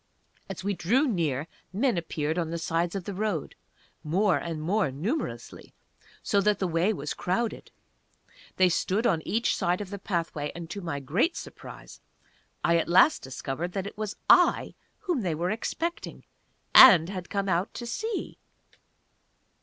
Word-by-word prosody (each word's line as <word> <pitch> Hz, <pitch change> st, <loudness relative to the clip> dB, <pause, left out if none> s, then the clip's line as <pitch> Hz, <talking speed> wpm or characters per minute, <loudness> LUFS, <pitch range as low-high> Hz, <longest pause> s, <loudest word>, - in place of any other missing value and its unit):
As 190 Hz, -1 st, -6 dB
we 200 Hz, +1 st, 0 dB
drew 225 Hz, -, +2 dB
near 160 Hz, -, -1 dB, 0.3 s
men 235 Hz, +5 st, +1 dB
appeared 160 Hz, -1 st, -2 dB
on 165 Hz, -2 st, -2 dB
the 170 Hz, -, -3 dB
sides 165 Hz, +2 st, -1 dB
of 195 Hz, -, -3 dB
the 200 Hz, -, -5 dB
road, 195 Hz, -6 st, -2 dB, 0.5 s
more 185 Hz, +6 st, +2 dB
and 165 Hz, -2 st, -5 dB
more 185 Hz, +2 st, 0 dB
numerously, 145 Hz, -, -5 dB, 0.5 s
so 200 Hz, -, +2 dB
that 210 Hz, +1 st, +2 dB
the 190 Hz, -, -1 dB
way 170 Hz, +5 st, +1 dB
was 150 Hz, -8 st, -4 dB
crowded. 220 Hz, +6 st, -2 dB, 0.9 s
They 185 Hz, -, +5 dB
stood 195 Hz, +6 st, 0 dB
on 165 Hz, -8 st, +2 dB
each 230 Hz, +3 st, +1 dB
side 180 Hz, -2 st, 0 dB
of 205 Hz, -2 st, -7 dB
the 200 Hz, -, -5 dB
pathway, 165 Hz, -6 st, -3 dB
and 170 Hz, -1 st, -8 dB
to 200 Hz, -, -5 dB
my 150 Hz, -5 st, -4 dB
great 180 Hz, -, 0 dB
surprise, -, -, -10 dB, 0.6 s
I 170 Hz, 0 st, +3 dB
at 165 Hz, -, -1 dB
last 185 Hz, -, +5 dB
discovered 135 Hz, +6 st, -5 dB
that 195 Hz, -1 st, -3 dB
it 200 Hz, -, -7 dB
was 210 Hz, -1 st, -4 dB
I -, -, +4 dB, 0.3 s
whom 355 Hz, -, -1 dB
they 175 Hz, -6 st, -1 dB
were 175 Hz, +4 st, -1 dB
expecting, 330 Hz, +10 st, -4 dB, 0.5 s
and 180 Hz, -11 st, +9 dB
had 185 Hz, -3 st, -6 dB
come 200 Hz, -1 st, -2 dB
out 185 Hz, +2 st, 0 dB
to 240 Hz, -, -5 dB
see! 440 Hz, -, -4 dB
185 Hz, 160 wpm, -27 LUFS, 165-210 Hz, 0.9 s, and